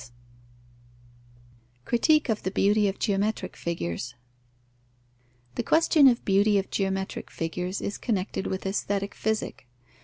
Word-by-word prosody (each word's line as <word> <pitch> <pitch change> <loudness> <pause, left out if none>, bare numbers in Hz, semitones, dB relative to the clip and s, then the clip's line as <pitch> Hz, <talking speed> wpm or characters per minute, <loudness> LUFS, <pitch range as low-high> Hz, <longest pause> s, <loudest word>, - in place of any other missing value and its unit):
Critique 305 +6 +3
of 220 -3 0
the 190 - -2
beauty 205 +2 +3
of 195 - -2
geometric 210 0 -1
figures. 120 - -4 1.4
The - - -1
question 315 -3 +5
of 250 - +6
the - - -29
beauty 200 +1 +3
of 195 - -2
geometrical 190 -1 -2
figures 180 +3 -3
is 200 - -4
connected 195 -4 -2
with 190 0 -4
aesthetic 200 0 -1
Physic. 220 - -3
200 Hz, 120 wpm, -27 LUFS, 190-220 Hz, 1.4 s, of